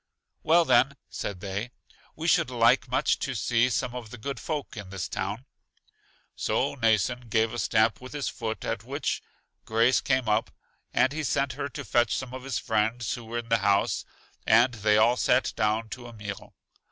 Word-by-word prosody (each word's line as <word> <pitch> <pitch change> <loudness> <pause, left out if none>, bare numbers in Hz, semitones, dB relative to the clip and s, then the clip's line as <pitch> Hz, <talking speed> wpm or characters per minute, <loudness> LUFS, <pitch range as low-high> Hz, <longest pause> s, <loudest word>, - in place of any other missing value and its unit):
Well, 170 +2 +4
then, 140 -1 +4
said 95 -3 -5
they, 100 +4 -4 0.5
we - - -4
should - - +3
like - - +3
much - - +1
to - - -3
see 120 +1 +2
some 125 0 -1
of 120 -3 -7
the 125 - -9
good 130 +3 -5
folk 150 -4 -4
in 100 -3 -7
this 95 -1 -4
town. 100 +7 -4 0.9
So - - 0
Mnason 115 0 +1
gave 110 +1 +2
a 120 - -3
stamp 110 +1 +2
with 130 +2 -9
his 145 -2 -3
foot, 110 -3 -4
at - - -3
which - - -2 0.4
Grace 115 +3 +3
came 130 -3 +1
up, 105 +1 +1 0.4
and 130 - +2
he 160 +1 -3
sent 140 -1 0
her 140 +2 -4
to 140 0 -7
fetch 120 +3 +2
some 130 -1 -6
of 130 0 -7
his 135 -3 -2
friends 110 +1 0
who 120 - -7
were 115 +1 -4
in 120 -1 -5
the 115 0 +3
house, 100 0 +2 0.4
and 120 +3 +5
they 105 -1 +2
all 120 +3 +4
sat 125 +1 +2
down 110 0 0
to 120 0 -8
a 120 - -11
meal. 105 -2 -8
115 Hz, 190 wpm, -27 LUFS, 110-130 Hz, 0.9 s, and